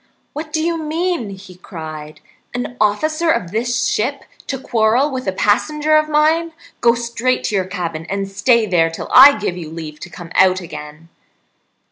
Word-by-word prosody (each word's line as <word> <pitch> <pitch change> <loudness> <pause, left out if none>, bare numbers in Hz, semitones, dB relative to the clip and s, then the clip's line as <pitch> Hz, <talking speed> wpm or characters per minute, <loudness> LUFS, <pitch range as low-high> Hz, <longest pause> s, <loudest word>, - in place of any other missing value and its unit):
"What 305 +1 -6
do 315 0 -1
you 335 0 -1
mean?" 320 - -2
he 195 -1 -11
cried. 155 -4 -9 0.3
"An 245 0 -4
officer 310 +11 +1
of 180 - 0
this 240 +2 -1
ship 270 +6 -1 0.2
to 270 - -2
quarrel 240 +3 +1
with 260 -3 -5
a - - +2
passenger 300 +11 +1
of 310 0 +3
mine! 320 +2 +2 0.3
Go 235 0 +4
straight 235 +2 -1
to 210 - -1
your 190 -2 +1
cabin, 170 -4 -5
and 195 0 -2
stay 230 +4 +2
there 170 -5 +2
till 165 - -7
I 280 +2 +9
give 210 -4 -3
you 170 -4 -7
leave 155 -2 -8
to - - -9
come 175 -1 -11
out 185 0 +4
again." 155 -1 -10
220 Hz, 175 wpm, -18 LUFS, 180-290 Hz, 0.3 s, I